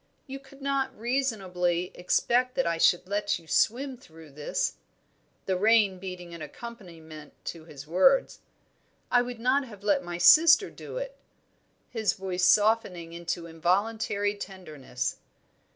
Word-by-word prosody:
You 270 Hz, 0 st, -7 dB
could 275 Hz, 0 st, -16 dB
not 270 Hz, -1 st, -1 dB
reasonably 190 Hz, -9 st, -1 dB
expect 245 Hz, +8 st, +1 dB
that 265 Hz, -, +1 dB
I 165 Hz, -1 st, -1 dB
should 175 Hz, +2 st, +3 dB
let 205 Hz, +1 st, 0 dB
you 170 Hz, -, -17 dB
swim 255 Hz, -, +1 dB
through 160 Hz, -, -16 dB
this" 145 Hz, +1 st, -2 dB, 0.7 s
the 190 Hz, -, 0 dB
rain 205 Hz, -1 st, +3 dB
beating 180 Hz, -2 st, -8 dB
an 170 Hz, -, -9 dB
accompaniment 160 Hz, -5 st, -10 dB
to 165 Hz, -2 st, -7 dB
his 145 Hz, -3 st, -11 dB
words. 190 Hz, -, +3 dB, 0.7 s
"I 245 Hz, -, +5 dB
would 245 Hz, -1 st, -6 dB
not 260 Hz, +4 st, +2 dB
have 205 Hz, -4 st, -13 dB
let 200 Hz, -3 st, +2 dB
my 175 Hz, 0 st, -5 dB
sister 320 Hz, -, +7 dB
do -, -, -9 dB
it" -, -, -6 dB, 0.7 s
his 220 Hz, -5 st, 0 dB
voice 185 Hz, -2 st, -2 dB
softening 200 Hz, -6 st, +2 dB
into 170 Hz, 0 st, -4 dB
involuntary 200 Hz, +5 st, 0 dB
tenderness. 150 Hz, -10 st, -6 dB
195 Hz, 135 wpm, -27 LUFS, 170-245 Hz, 0.7 s, sister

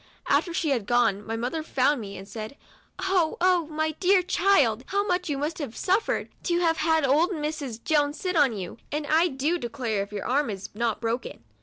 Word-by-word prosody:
After 345 Hz, -, +2 dB
she 335 Hz, -2 st, -1 dB
had 235 Hz, -7 st, -1 dB
gone, 225 Hz, -4 st, +2 dB
my 225 Hz, +2 st, -4 dB
mother 250 Hz, +7 st, -2 dB
found 280 Hz, -3 st, +1 dB
me, 200 Hz, -2 st, -7 dB
and 195 Hz, +1 st, -10 dB
said, 220 Hz, +6 st, -7 dB, 0.2 s
" -, -, -31 dB
Oh, 350 Hz, -5 st, +2 dB
oh, 355 Hz, -3 st, +3 dB
my 315 Hz, 0 st, -1 dB
dear 370 Hz, +4 st, +3 dB
child! 315 Hz, -, +3 dB
how 400 Hz, +1 st, 0 dB
much 360 Hz, -3 st, -1 dB
you 285 Hz, -, -1 dB
must 300 Hz, +4 st, -3 dB
have 275 Hz, -7 st, -5 dB
suffered, 390 Hz, +4 st, 0 dB, 0.2 s
to 345 Hz, -1 st, +1 dB
have 330 Hz, -2 st, +2 dB
had 320 Hz, -1 st, +2 dB
old 300 Hz, +7 st, +3 dB
Mrs. 295 Hz, -, -4 dB
Jones 295 Hz, -1 st, +1 dB
sit 365 Hz, -1 st, -2 dB
on 285 Hz, -6 st, +4 dB
you, 185 Hz, +3 st, -7 dB
and 295 Hz, 0 st, -2 dB
I 320 Hz, +4 st, +4 dB
do 300 Hz, +4 st, -1 dB
declare 235 Hz, -5 st, -2 dB
if 200 Hz, -, -6 dB
your 205 Hz, -1 st, -5 dB
arm 275 Hz, +1 st, +1 dB
is 195 Hz, -2 st, -6 dB
not 225 Hz, 0 st, -1 dB
broken 230 Hz, -, -3 dB
290 Hz, 210 wpm, -26 LUFS, 235-335 Hz, 0.2 s, on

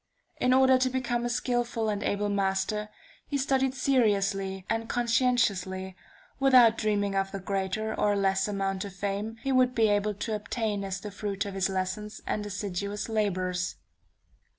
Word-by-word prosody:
In 250 Hz, -, +2 dB
order 260 Hz, 0 st, +5 dB
to 255 Hz, 0 st, +2 dB
become 240 Hz, -2 st, -1 dB
a -, -, 0 dB
skillful 240 Hz, -2 st, -1 dB
and 205 Hz, -1 st, -1 dB
able 205 Hz, 0 st, 0 dB
master, 200 Hz, +1 st, 0 dB, 0.4 s
he 285 Hz, -, -1 dB
studied 265 Hz, -1 st, +1 dB
seriously 200 Hz, -7 st, +1 dB
and 225 Hz, 0 st, -2 dB
conscientiously, 230 Hz, -7 st, +1 dB, 0.4 s
without 255 Hz, -4 st, +6 dB
dreaming 205 Hz, -2 st, 0 dB
of 195 Hz, 0 st, 0 dB
the 195 Hz, -, -4 dB
greater 195 Hz, +3 st, -2 dB
or 205 Hz, -1 st, +1 dB
less 195 Hz, 0 st, +1 dB
amount 195 Hz, -2 st, -2 dB
of 200 Hz, -2 st, -8 dB
fame 200 Hz, +3 st, -3 dB
he 270 Hz, -, 0 dB
would 255 Hz, -1 st, +3 dB
be 225 Hz, -2 st, +4 dB
able 205 Hz, 0 st, +1 dB
to 215 Hz, +2 st, -3 dB
obtain 210 Hz, -1 st, -2 dB
as 195 Hz, -1 st, -4 dB
the 210 Hz, -, -6 dB
fruit 200 Hz, 0 st, -3 dB
of 200 Hz, -, -5 dB
his 195 Hz, 0 st, 0 dB
lessons 190 Hz, +3 st, -3 dB
and 210 Hz, -, -2 dB
assiduous 200 Hz, +1 st, -4 dB
labors. 185 Hz, -, -1 dB
210 Hz, 160 wpm, -28 LUFS, 195-235 Hz, 0.4 s, without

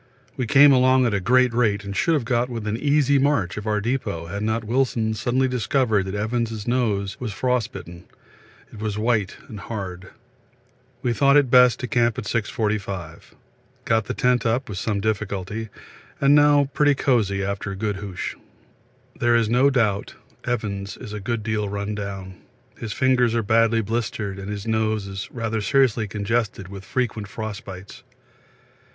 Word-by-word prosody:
We 125 Hz, -3 st, -2 dB
came 140 Hz, +5 st, +7 dB
along 130 Hz, 0 st, +4 dB
at 115 Hz, -, +1 dB
a 100 Hz, -, +1 dB
great 125 Hz, +5 st, +3 dB
rate 105 Hz, -4 st, +1 dB
and 100 Hz, 0 st, -6 dB
should 165 Hz, -, +2 dB
have 140 Hz, -6 st, -1 dB
got 120 Hz, +1 st, 0 dB
within 110 Hz, -3 st, -3 dB
an -, -, -6 dB
easy 145 Hz, -1 st, +3 dB
march 135 Hz, -11 st, +1 dB
of 105 Hz, +1 st, -6 dB
our 105 Hz, -1 st, +1 dB
depot 110 Hz, -7 st, -2 dB
had 100 Hz, +5 st, -5 dB
not 110 Hz, +1 st, -1 dB
Wilson 115 Hz, -1 st, 0 dB
suddenly 125 Hz, +4 st, 0 dB
discovered 125 Hz, -4 st, +1 dB
that 95 Hz, -, -4 dB
Evans' 110 Hz, 0 st, -2 dB
nose 105 Hz, -6 st, 0 dB
was 120 Hz, -4 st, -4 dB
frostbitten 110 Hz, -7 st, -3 dB, 0.7 s
it 110 Hz, -, -10 dB
was 105 Hz, -1 st, -3 dB
white 110 Hz, -3 st, 0 dB
and 105 Hz, -, -8 dB
hard. 95 Hz, -3 st, -6 dB, 0.9 s
We 120 Hz, -2 st, +1 dB
thought 140 Hz, +4 st, +4 dB
it 135 Hz, -4 st, +3 dB
best 125 Hz, -1 st, +6 dB
to 125 Hz, -, -3 dB
camp 120 Hz, 0 st, +1 dB
at 125 Hz, -, -3 dB
6.45. 105 Hz, -6 st, -3 dB, 0.5 s
Got 110 Hz, -2 st, +2 dB
the -, -, -4 dB
tent 125 Hz, -2 st, +2 dB
up 120 Hz, +3 st, 0 dB
with 95 Hz, -3 st, -4 dB
some 100 Hz, -2 st, -1 dB
difficulty, 105 Hz, 0 st, -3 dB, 0.5 s
and 140 Hz, +1 st, +4 dB
now 145 Hz, -1 st, +5 dB
pretty 145 Hz, -1 st, +3 dB
cosy 105 Hz, -8 st, +1 dB
after 100 Hz, 0 st, -3 dB
good 105 Hz, 0 st, -2 dB
hoosh. 95 Hz, -2 st, -5 dB, 0.9 s
There 120 Hz, 0 st, +3 dB
is 115 Hz, -2 st, +2 dB
no 125 Hz, +4 st, +4 dB
doubt 110 Hz, -7 st, 0 dB, 0.3 s
Evans 100 Hz, -5 st, -3 dB
is 105 Hz, -, -9 dB
a 105 Hz, -, -4 dB
good 110 Hz, +2 st, -3 dB
deal 105 Hz, -2 st, -1 dB
run 100 Hz, +1 st, -3 dB
down 95 Hz, -3 st, -6 dB, 0.3 s
his 115 Hz, -2 st, -6 dB
fingers 125 Hz, -2 st, +2 dB
are 115 Hz, -, +1 dB
badly 115 Hz, +1 st, +3 dB
blistered 105 Hz, -2 st, -3 dB
and 95 Hz, +1 st, -7 dB
his 100 Hz, -1 st, -5 dB
nose 110 Hz, -2 st, 0 dB
is 95 Hz, 0 st, -6 dB
rather 115 Hz, -2 st, -2 dB
seriously 120 Hz, -2 st, +2 dB
congested 105 Hz, -1 st, -2 dB
with 100 Hz, 0 st, -9 dB
frequent 110 Hz, -3 st, -2 dB
frost 110 Hz, 0 st, -6 dB
bites. 95 Hz, +1 st, -10 dB
110 Hz, 170 wpm, -23 LUFS, 100-125 Hz, 0.9 s, came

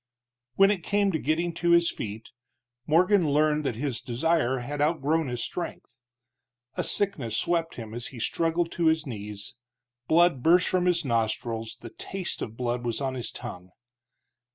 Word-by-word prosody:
When 195 Hz, +1 st, +6 dB
it 195 Hz, -4 st, -1 dB
came 200 Hz, 0 st, +2 dB
to 160 Hz, -, -1 dB
getting 165 Hz, +4 st, 0 dB
to 170 Hz, +1 st, +2 dB
his 170 Hz, 0 st, +5 dB
feet, 110 Hz, +2 st, -7 dB, 0.6 s
Morgan 175 Hz, +1 st, +4 dB
learned 150 Hz, +1 st, +2 dB
that 125 Hz, -, -1 dB
his 125 Hz, -1 st, -2 dB
desire 130 Hz, +1 st, +1 dB
had 140 Hz, +4 st, -4 dB
outgrown 155 Hz, 0 st, +1 dB
his 120 Hz, -2 st, -3 dB
strength. 130 Hz, -8 st, -6 dB, 0.8 s
A -, -, -1 dB
sickness 135 Hz, -, +1 dB
swept 165 Hz, +1 st, 0 dB
him 110 Hz, -2 st, -8 dB
as 120 Hz, +1 st, -5 dB
he 125 Hz, -, -10 dB
struggled 165 Hz, +6 st, 0 dB
to 170 Hz, -1 st, +1 dB
his 160 Hz, -1 st, +2 dB
knees; 105 Hz, -5 st, -6 dB, 0.5 s
blood 170 Hz, -4 st, +4 dB
burst 175 Hz, +6 st, +5 dB
from 180 Hz, -1 st, +1 dB
his 170 Hz, -3 st, +2 dB
nostrils, 115 Hz, -1 st, -1 dB
the 115 Hz, -, -9 dB
taste 190 Hz, -2 st, -5 dB
of 110 Hz, +1 st, -5 dB
blood 120 Hz, -1 st, -2 dB
was 120 Hz, -2 st, -1 dB
on 135 Hz, -2 st, -2 dB
his 125 Hz, -2 st, -3 dB
tongue. 90 Hz, -7 st, -8 dB
145 Hz, 165 wpm, -27 LUFS, 120-170 Hz, 0.8 s, When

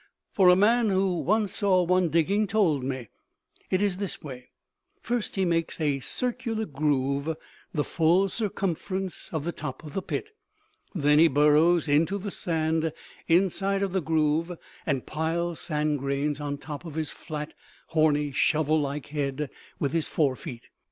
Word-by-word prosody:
"For 190 Hz, -3 st, +5 dB
a 180 Hz, -, +7 dB
man 225 Hz, +4 st, +4 dB
who 190 Hz, -2 st, +1 dB
once 210 Hz, -1 st, +1 dB
saw 190 Hz, -3 st, +3 dB
one 180 Hz, 0 st, +2 dB
digging 195 Hz, +7 st, +2 dB
told 185 Hz, -10 st, +2 dB
me. 130 Hz, -4 st, -4 dB, 0.6 s
It 185 Hz, +2 st, +1 dB
is 195 Hz, -2 st, 0 dB
this 200 Hz, -4 st, -4 dB
way: 130 Hz, -4 st, -9 dB, 0.5 s
First 240 Hz, -2 st, -2 dB
he 190 Hz, -1 st, +1 dB
makes 165 Hz, -1 st, 0 dB
a 145 Hz, -3 st, +1 dB
circular 235 Hz, -, -1 dB
groove 140 Hz, 0 st, 0 dB, 0.3 s
the 150 Hz, -, 0 dB
full 170 Hz, +6 st, +3 dB
circumference 190 Hz, -2 st, -3 dB
of 160 Hz, -3 st, -2 dB
the 170 Hz, -, -1 dB
top 130 Hz, -2 st, -6 dB
of 150 Hz, -2 st, -9 dB
the 195 Hz, -, -1 dB
pit. 420 Hz, -, -4 dB, 0.7 s
Then 150 Hz, -2 st, +4 dB
he 165 Hz, -, +8 dB
burrows 150 Hz, +4 st, +4 dB
into 160 Hz, +7 st, +2 dB
the 200 Hz, 0 st, -5 dB
sand 160 Hz, -2 st, 0 dB, 0.4 s
inside 195 Hz, +3 st, +2 dB
of 195 Hz, -, -1 dB
the 190 Hz, -, +1 dB
groove 160 Hz, +1 st, +1 dB, 0.4 s
and 135 Hz, -3 st, 0 dB
piles 165 Hz, +2 st, -2 dB
sand 150 Hz, -2 st, -1 dB
grains 140 Hz, +2 st, -1 dB
on 145 Hz, -1 st, -3 dB
top 145 Hz, +1 st, -7 dB
of 165 Hz, -4 st, -8 dB
his 155 Hz, -2 st, -2 dB
flat, 150 Hz, -1 st, -6 dB, 0.4 s
horny, 150 Hz, -2 st, +2 dB
shovel 155 Hz, +2 st, +2 dB
like 140 Hz, 0 st, -4 dB
head 145 Hz, -1 st, -2 dB, 0.3 s
with 140 Hz, -, -1 dB
his 165 Hz, -2 st, 0 dB
fore 140 Hz, -5 st, +1 dB
feet. 120 Hz, -1 st, -8 dB
160 Hz, 160 wpm, -27 LUFS, 150-190 Hz, 0.7 s, he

